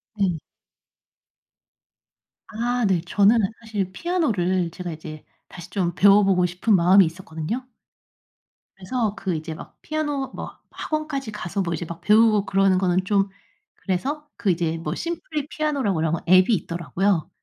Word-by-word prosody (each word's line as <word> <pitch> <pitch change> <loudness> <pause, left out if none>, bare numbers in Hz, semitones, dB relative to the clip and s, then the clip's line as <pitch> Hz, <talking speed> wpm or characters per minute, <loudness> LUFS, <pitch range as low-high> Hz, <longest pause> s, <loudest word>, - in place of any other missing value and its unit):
네. 190 -5 0 2.1
아 240 +2 -1
네 185 -4 +2
저는 205 +5 +4 0.2
사실 210 -5 -3
피아노를 190 - 0
제가 175 0 -6
이제 155 -1 -9 0.2
다시 175 -1 -10
좀 180 -3 -1
배워보고 195 -2 +5
싶은 180 +5 +1
마음이 185 +3 +6
있었거든요. 165 +8 -5 1.1
그래서 210 +2 -2
그 190 -5 -2
이제 155 0 -5
막 - - -12
피아노 295 -3 -2
뭐 - - -7
학원까지 305 -6 -4
가서 200 -2 -3
뭐 170 -2 -2
이제 175 - -3
막 170 0 -8
배우고 215 -1 +4
그러는 195 -1 +3
거는 185 0 +1
좀 195 0 +2 0.5
그래서 285 +11 -3
그 210 -5 +1
이제 165 -1 -1
뭐 160 -1 -4
Simply 310 - -4
Piano라고 285 -11 -1
그런 160 0 0 0.2
앱이 185 +5 +6
있더라고요. 175 -1 -1
195 Hz, 315 characters per minute, -23 LUFS, 175-230 Hz, 2.1 s, 마음이